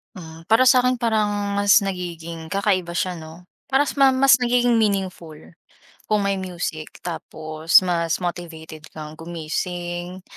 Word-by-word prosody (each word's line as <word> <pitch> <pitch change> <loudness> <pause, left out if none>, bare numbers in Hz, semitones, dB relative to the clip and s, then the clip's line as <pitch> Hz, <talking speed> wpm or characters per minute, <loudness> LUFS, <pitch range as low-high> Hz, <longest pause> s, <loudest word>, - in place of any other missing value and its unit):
Hmm, 165 -3 -10
para 240 +4 +5
sakin 250 -1 +4
parang 210 -3 0
mas 200 0 +5
nagiging 170 -3 -6
kakaiba 195 -3 0
siya, 185 -1 -1
'no. 165 +1 -11 0.2
Parang 275 +2 +3
ma 275 -1 +5 0.2
mas 275 - +8
nagiging 245 0 +2
meaningful, 190 -7 -1 0.7
kung 210 -1 +1
may 200 -1 0
music, 170 -4 -6
tapos 160 -1 +1
mas 170 -1 -1
motivated 160 -3 -6
kang 155 0 -9
gumising 175 +2 -5
180 Hz, 125 wpm, -22 LUFS, 165-205 Hz, 0.7 s, mas